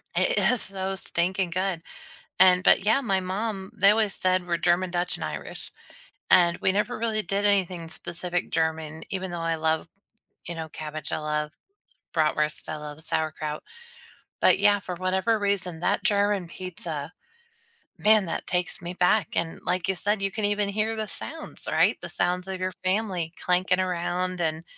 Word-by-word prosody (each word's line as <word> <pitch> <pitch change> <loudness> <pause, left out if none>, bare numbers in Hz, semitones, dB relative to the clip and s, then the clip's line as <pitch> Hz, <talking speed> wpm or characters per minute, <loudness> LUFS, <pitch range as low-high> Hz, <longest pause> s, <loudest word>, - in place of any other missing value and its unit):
It - - +3
is 250 - 0
so 195 0 -3
stinking 185 0 -1
good. 185 -1 -1 0.6
And 185 -1 +7
but, 195 - +5
yeah, 225 +6 +4
my 195 -7 +1
mom 190 +1 -3
they 200 -1 +6
always 215 -1 +2
said 185 -1 +1
we're 170 -1 +1
German, 175 +2 +2
Dutch, 175 0 -1
and - - -6
Irish, - - -7 0.6
and 170 -1 +6
we 190 - +2
never 210 +5 -1
really 220 -1 +1
did 200 0 -1
anything 185 -5 +2
specific 175 +2 -4
German 160 -1 -1
even 190 -1 -3
though 175 - -4
I 165 0 0
love, 160 +1 0 0.6
you 170 - -3
know, 160 -1 -5
cabbage. 155 -1 -6
I - - 0
love 150 0 -2 0.6
bratwurst. 150 -1 0
I 155 - -3
love 150 0 -8
sauerkraut. 155 -1 -2 0.8
But, - - +5
yeah, 205 0 +5
for 185 -1 -5
whatever 190 +5 +1
reason, 195 -5 -1
that 200 +3 +1
German 205 -4 +2
pizza, 165 -4 -6 0.9
man, 215 -1 +5
that - - -4
takes 180 0 -1
me 175 +1 -5
back. 180 +1 +3
And 165 -1 -1
like 180 -1 0
you 190 - +2
said, 205 +2 0
you 195 - +1
can 215 +2 -3
even 205 0 +1
hear 215 +2 0
the 215 -1 -3
sounds, 320 +9 -8
right? - - +4
The - - -6
sounds 180 +1 -1
of 190 -1 -4
your 185 0 -1
family 185 -4 0
clanking 180 +1 +2
around 180 0 -1
and 160 -1 -1
185 Hz, 170 wpm, -26 LUFS, 170-200 Hz, 0.9 s, And